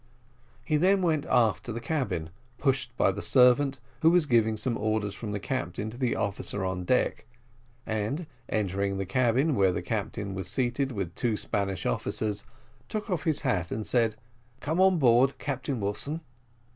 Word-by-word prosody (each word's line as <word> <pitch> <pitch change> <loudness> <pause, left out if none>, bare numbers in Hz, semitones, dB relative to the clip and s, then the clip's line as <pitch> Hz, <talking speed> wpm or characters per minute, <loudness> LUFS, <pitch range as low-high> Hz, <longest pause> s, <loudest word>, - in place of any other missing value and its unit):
He 155 - +2
then 190 +4 +3
went 155 -3 +1
aft 115 -4 +3
to 120 - -4
the 115 - -4
cabin, 120 - -2 0.3
pushed 130 -3 0
by - - +4
the 100 +1 -5
servant, 130 +2 +4 0.2
who 160 - +6
was 175 -2 +4
giving 110 -4 +2
some 115 +2 -1
orders 110 -2 -1
from 110 -3 -6
the 100 - -2
captain 105 -3 -3
to 120 - -9
the 125 -3 +1
officer 100 0 -2
on 95 -1 -3
deck, 125 +7 +1 0.6
and 110 +10 -2 0.2
entering 100 -1 -1
the 95 - -2
cabin, 130 - +2
where 95 -5 +3
the 90 - -3
captain 105 0 -3
was 95 -2 -4
seated 130 +5 0
with 95 -7 -4
two 115 -3 0
Spanish 100 -3 -2
officers, 105 - -1 0.5
took 215 -1 -4
off 180 -1 -1
his 155 -3 +1
hat 95 - 0
and 110 0 -3
said: 115 -3 +2 0.4
"Come 160 +6 0
on 190 -1 +5
board, 130 -1 +4
Captain 135 -2 -3
Wilson." 110 +11 -2
115 Hz, 170 wpm, -28 LUFS, 100-140 Hz, 0.6 s, who